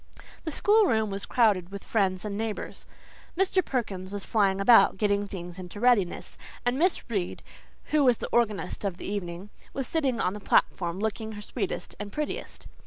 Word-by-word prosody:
The 320 - -2
school 420 +7 +4
room 220 - +1
was 195 +1 -3
crowded 205 -7 +3
with 200 0 -8
friends 190 -3 0
and 205 -1 -3
neighbours. 220 0 -4 0.5
Mr. 380 0 +3
Perkins 195 -9 -3
was 200 -1 -3
flying 195 -4 +2
about, 210 0 +6
getting 205 0 +1
things 180 -2 -7
into 185 +2 -8
readiness, 225 -7 +1 0.3
and 245 +2 +1
Miss 360 +2 +1
Reade, 200 -7 -3 0.5
who 300 -1 +4
was 250 -4 +5
the - - -5
organist 220 -4 0
of 195 -3 -2
the - - -8
evening, 190 -1 -5 0.2
was 270 -2 -3
sitting 275 -7 0
on 180 - +1
the 210 - -6
platform, 175 -2 +1
looking 220 +1 -2
her 210 - -7
sweetest 200 -5 -4
and 205 0 -6
prettiest. 300 +4 -4
210 Hz, 175 wpm, -27 LUFS, 195-245 Hz, 0.5 s, about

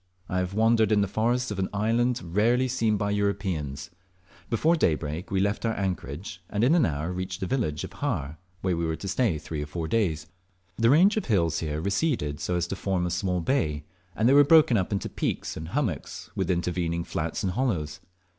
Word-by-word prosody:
I 90 - -1
have 90 +1 -3
wandered 110 -1 +3
in 105 -1 +4
the 100 - +1
forests 120 +4 0
of 100 - -4
an 95 - -1
island 115 +4 +1
rarely 115 +9 +2
seen 115 -4 +1
by 100 0 -1
Europeans. 95 -9 -2 0.6
Before 155 +9 +3
daybreak 80 - -1
we 95 - 0
left 100 +2 0
our 115 -1 0
anchorage, 90 -1 -4
and 105 +2 0
in 130 +6 +5
an 175 - +4
hour 75 +4 -3
reached 90 0 -4
the 95 - -2
village 100 - -1
of - - -7
Har, 70 +3 -3 0.2
where 95 -2 0
we 85 - -2
were 80 -1 -1
to 95 - -7
stay 95 -3 +1
three 75 0 -5
or 75 - -4
four 80 +2 -4
days. 80 -7 0 0.5
The 115 +2 +3
range 180 - +5
of 215 - -1
hills 85 -7 +1
here 75 -2 -3
receded 100 - -1
so 90 - -1
as 85 -1 0
to - - -2
form 95 -2 -1
a 90 - -2
small 90 +1 -1
bay, 80 - 0 0.3
and 110 - +2
they 130 - +5
were 145 +1 +8
broken 150 -4 +6
up 95 -2 0
into 100 - -1
peaks - - -3
and 80 - -6
hummocks 110 - -3
with - - -1
intervening 85 -1 -1
flats 80 +3 -3
and 95 - 0
hollows. 90 - -1
95 Hz, 210 wpm, -27 LUFS, 85-115 Hz, 0.6 s, were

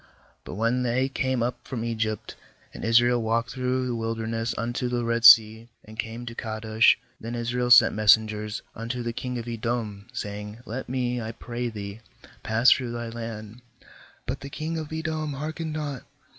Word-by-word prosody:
16But - - -6
when 115 +4 +1
they 125 +2 +1
came 130 -2 0
up 125 +1 -2
from 115 -4 -3
Egypt, 110 -2 -2 0.4
and - - -8
Israel 120 +1 +4
walked 115 +2 0
through 130 0 -1
the 125 - -2
wilder 115 -1 -3
ness 115 +1 -2
unto 120 +2 -2
the 120 -1 -1
Red 115 0 0
Sea, 110 0 +8 0.2
and 110 +1 -13
came 115 +2 -4
to 115 - -6
Kadesh; 110 -1 +2 0.2
17then 115 +2 -5
Israel 120 +1 -1
sent 125 - +8
messengers 105 0 +3
unto 120 +2 -4
the 120 0 -3
king 125 +1 -4
of 120 0 -6
Edom, 115 -3 -3
saying: 105 -2 -6
Let 120 +4 -5
me, 125 -1 -1
I 110 0 -4
pray 120 +1 -4
thee, 100 -1 -7 0.4
pass 115 +3 +4
through 125 -3 +2
thy 120 -1 -4
land; 115 0 -7 0.6
but - - -3
the 140 - -8
king 155 +3 -4
of 155 -1 -7
Edom 155 -1 -3
heark 155 +3 -5
ened 160 -2 -3
not. 145 -4 -4
115 Hz, 180 wpm, -26 LUFS, 110-125 Hz, 0.6 s, Sea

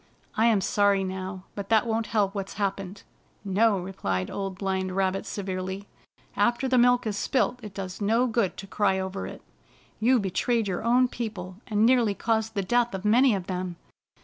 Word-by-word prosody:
I 225 +2 +4
am 215 -4 +3
sorry 200 0 +2
now, 185 0 -5
but 200 -1 -6
that 225 0 +4
won't 225 -1 -1
help 205 -3 +1
what's 195 -2 -4
happened." 195 -1 -3 0.4
"No," 205 +2 +3
replied 95 - -3
Old 195 -2 -4
Blind 190 -1 -2
Rabbit 195 0 0
severely, 190 0 -4 0.5
"after 240 +5 +2
the 255 -1 +3
milk 245 0 +4
is 215 -2 -1
spilt 250 +2 0
it 210 -3 -9
does 190 0 -6
no 225 +5 +3
good 230 -5 0
to 195 - -7
cry 195 -1 +1
over 190 +1 -4
it. - - -10 0.6
You 245 +3 +4
betrayed 220 +3 0
your 185 +1 -2
own 245 +2 +4
people, 195 -7 -6
and 210 0 +2
nearly 235 -4 +4
caused 220 0 -1
the 200 - 0
death 240 +2 +1
of 190 +2 -6
many 240 +2 +5
of 190 -2 -4
them. 180 -1 -3
200 Hz, 180 wpm, -26 LUFS, 190-225 Hz, 0.6 s, many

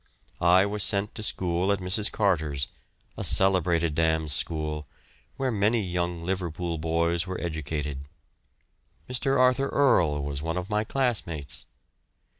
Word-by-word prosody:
I 90 +3 +5
was 105 +1 -3
sent 100 +2 +1
to 110 - -6
school 90 -2 0
at 100 - +2
Mrs. 95 +3 +1
Carter's, 80 -9 +1 0.5
a - - -3
celebrated 85 -4 +3
dame's 80 -1 +1
school, 75 0 -2 0.5
where 135 -1 0
many 110 +1 +2
young 90 -2 -2
Liverpool 85 -2 -3
boys 85 +2 0
were 95 - -4
educated. 75 -4 -3 1.1
Mr. 135 +2 +1
Arthur 130 +2 +3
Earle 85 - +3
was 70 0 -4
one 80 +2 -2
of 90 +3 -4
my 105 0 +1
classmates. 105 - -2
90 Hz, 130 wpm, -27 LUFS, 80-100 Hz, 1.1 s, I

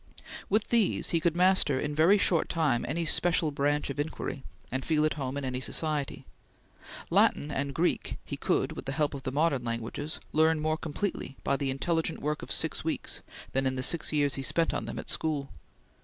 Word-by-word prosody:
With 210 +2 +2
these, 230 -5 +2
he 170 - +3
could 165 0 +1
master 180 -6 +4
in 150 +1 -2
very 165 +7 +5
short 175 -5 +2
time 150 -8 +1
any 165 +4 -1
special 165 -1 +2
branch 145 0 0
of 140 - -7
inquiry, 145 -2 -3 0.3
and 130 +1 -2
feel 155 -1 +2
at 155 - +1
home 135 -2 -4
in 140 - -3
any 125 -1 -2
society. 150 +1 0 0.9
Latin 150 - +3
and 140 0 -1
Greek, 175 +2 0
he - - -4
could, - - 0
with - - -7
the 135 - -3
help 150 -1 +1
of 140 - -5
the 130 -1 -3
modern 145 -2 +1
languages, 115 +6 -4
learn 160 0 +4
more 155 +1 +1
completely 160 -2 -4
by 140 - +2
the 140 -1 -1
intelligent 160 +4 -1
work 150 +1 -2
of - - -8
six - - -1
weeks - - -2 0.3
than 135 0 +1
in 130 - -1
the 130 - -2
six 165 +4 +1
years 145 -3 +2
he 135 - -2
spent 165 +4 +1
on - - -2
them - - -6
at - - -6
school. 150 -3 -1
150 Hz, 200 wpm, -29 LUFS, 135-165 Hz, 0.9 s, very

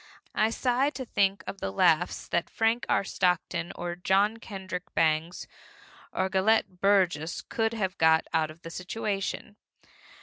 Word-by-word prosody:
I 220 - +2
sigh 250 +4 +1
to 260 - -5
think 200 -3 +1
of 195 - -6
the - - -2
laughs 155 - +2
that 170 - 0
Frank 225 +3 0
R. - - +3
Stockton 175 -2 0
or 175 0 -4
John 195 +5 +2
Kendrick 190 -5 -7
Bangs 160 +2 +1 0.7
or 190 - 0
Gelett 190 -1 +1
Burgess 180 -5 +2
could 225 0 -1
have 195 -4 -2
got 160 0 +5
out 160 -1 +2
of 155 +2 -13
the 165 - -8
situation. 200 +2 -4
190 Hz, 145 wpm, -28 LUFS, 170-215 Hz, 0.7 s, got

